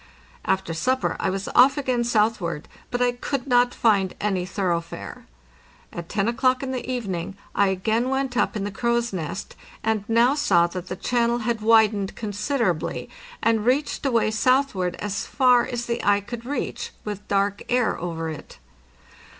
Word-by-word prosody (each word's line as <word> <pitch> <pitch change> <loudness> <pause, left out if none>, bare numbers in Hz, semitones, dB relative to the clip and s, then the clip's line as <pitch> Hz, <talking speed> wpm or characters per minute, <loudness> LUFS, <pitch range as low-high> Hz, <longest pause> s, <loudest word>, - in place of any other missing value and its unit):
After 190 -3 0
supper 255 +10 0
I - - 0
was 195 +1 -3
off 270 +3 +6
again 255 -4 0
southward, 210 -9 0 0.2
but 245 0 0
I 245 - +3
could 245 +2 -3
not 245 -2 +3
find 200 -5 +2
any 190 -3 -1
thoroughfare. 175 -4 -3 0.7
At 170 -1 -7
to 200 0 0
o'clock 255 +2 +2
in 265 - -3
the 255 -2 -3
evening 195 -7 -3 0.2
I 200 - +3
again 220 +6 0
went 265 -1 -1
up 215 - +1
in 205 - -2
the 205 - -3
crow's 235 +2 0
nest, 180 +3 -5 0.3
and 220 -2 0
now 235 +3 +4
saw 190 - +3
that 180 +1 -6
the 185 - -4
channel 235 +3 +1
had 230 -2 -1
widened 215 -3 +3
considerably 210 - -2 0.3
and 225 -2 +2
reached 265 +5 0
away 235 -5 +2
southward 220 -6 +1
as 205 +1 -4
far 250 -3 +4
as 240 -1 -3
the 235 0 -2
eye 205 0 +3
could 235 +3 -8
reach, 285 - -3 0.2
with 205 -1 -6
dark 200 0 0
air 245 -2 +2
over 165 -1 -4
it. 155 -2 -8
220 Hz, 165 wpm, -24 LUFS, 195-245 Hz, 0.7 s, off